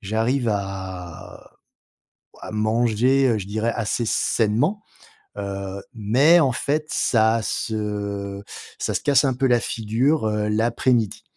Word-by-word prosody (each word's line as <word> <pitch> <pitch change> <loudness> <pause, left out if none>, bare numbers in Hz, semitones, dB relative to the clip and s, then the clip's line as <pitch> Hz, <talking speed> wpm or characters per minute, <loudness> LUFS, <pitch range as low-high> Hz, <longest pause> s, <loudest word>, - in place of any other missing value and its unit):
J'arrive 115 +5 0
à 95 -4 -6 0.9
à - - -8
manger, 120 +4 +2
heu, 115 - +2
je 95 - -6
dirais 110 +3 -1
assez 115 +1 -1
sainement. 120 - +1 0.6
Heu, 100 -1 -5
mais, 125 +11 +4
en 135 -6 +2
fait, 150 +4 -1
ça 110 -1 +2
se 100 -2 -3 0.4
ça - - -2
se - - -1
casse 140 -1 +3
un 135 - +1
peu 135 +2 -1
la 120 -2 +3
figure, 115 +6 0
heu, 105 0 -1
l'après-midi. 115 0 +1
110 Hz, 125 wpm, -22 LUFS, 105-125 Hz, 0.9 s, mais